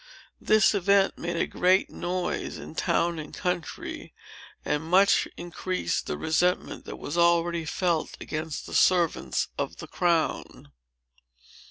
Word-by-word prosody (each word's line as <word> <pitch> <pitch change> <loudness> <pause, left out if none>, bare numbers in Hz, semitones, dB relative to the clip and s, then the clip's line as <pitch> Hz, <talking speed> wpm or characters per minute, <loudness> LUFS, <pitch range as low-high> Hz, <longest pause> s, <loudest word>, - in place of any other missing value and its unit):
This 215 -1 +4
event 200 0 +2
made 170 0 -3
a - - +1
great 185 +2 +2
noise 180 0 -3
in - - -9
town 170 +1 0
and 155 - -7
country, 180 -3 -4 0.5
and 150 - 0
much 185 +5 +4
increased 175 - -3
the 75 - -3
resentment 180 - 0
that - - -7
was 155 +4 -4
already 170 -1 +3
felt 170 0 -1
against 155 -1 -5
the - - -9
servants 175 -3 +2
of - - -3
the - - -8
crown. 170 -3 -1
175 Hz, 130 wpm, -27 LUFS, 160-180 Hz, 0.5 s, This